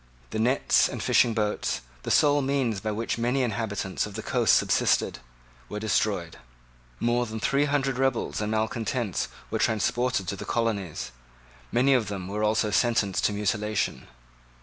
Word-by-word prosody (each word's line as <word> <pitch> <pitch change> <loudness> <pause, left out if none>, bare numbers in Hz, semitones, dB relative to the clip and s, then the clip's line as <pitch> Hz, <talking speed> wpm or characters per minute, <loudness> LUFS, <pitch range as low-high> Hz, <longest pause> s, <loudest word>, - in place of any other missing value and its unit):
The 110 - -2
nets 125 +5 +3
and - - -5
fishing 115 -2 +3
boats, 105 -2 -1 0.2
the - - -5
sole 145 -1 +4
means 130 -6 0
by 110 +2 -3
which 115 +2 -2
many 125 +3 +1
inhabitants 100 -4 -2
of 105 - -10
the 110 - -5
coast - - +3
subsisted, - - +2 0.5
were 105 - -4
destroyed. 110 -3 0 0.6
More 120 +1 +1
than 110 +1 -5
three 140 +5 +2
hundred 135 -3 0
rebels 135 -5 0
and 105 0 -2
malecontents 110 0 -1 0.2
were - - -1
transported 115 -1 +1
to - - -2
the - - -7
colonies. 105 -8 -2 0.6
Many 130 +3 +4
of 120 -5 +2
them 95 -3 -5
were 105 +2 -3
also 110 0 +1
Sentenced 105 -4 +1
to - - +3
mutilation. 105 - -1
110 Hz, 155 wpm, -26 LUFS, 105-125 Hz, 0.6 s, sole